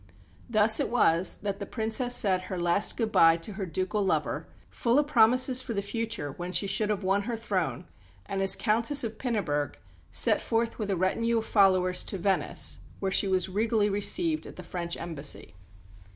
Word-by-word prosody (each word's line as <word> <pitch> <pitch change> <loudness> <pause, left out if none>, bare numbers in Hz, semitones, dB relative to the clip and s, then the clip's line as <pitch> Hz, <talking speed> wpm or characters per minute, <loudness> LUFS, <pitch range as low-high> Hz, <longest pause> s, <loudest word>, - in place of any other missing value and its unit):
Thus 215 -1 +4
it - - -1
was 180 -7 +1
that 200 -1 -3
the 200 - -5
Princess 230 +2 -1
said 190 -3 +2
her 185 - -4
last 175 +4 +1
good 225 -2 -1
bye 165 -3 +5
to 170 +5 -5
her 195 -1 -5
ducal 185 +5 -2
lover, 190 - -1 0.2
full 235 +2 0
of 295 - +3
promises 255 0 +5
for 235 -3 -5
the 200 - -2
future 225 -7 -4
when 175 +5 -7
she 180 +3 +1
should 210 +2 -1
have 205 -2 -2
won 195 +2 +1
her 235 +3 -4
throne, 185 - -3 0.4
and 195 0 -3
as 195 - +5
"Countess 230 +6 +1
of 220 -1 -5
Pinneberg" 175 - -2 0.4
set - - +3
forth 230 0 -2
with 210 -2 -3
a 195 - 0
retinue 230 +6 0
of 220 - -2
followers 185 -3 +3
to 195 - -4
Venice, 190 +2 -1 0.2
where 195 -1 -2
she 195 - +2
was 185 -1 +1
regally 210 +1 0
received 310 - +1
at - - -11
the 180 - -9
French 170 0 -5
embassy. 155 - -3
205 Hz, 190 wpm, -27 LUFS, 185-230 Hz, 0.4 s, bye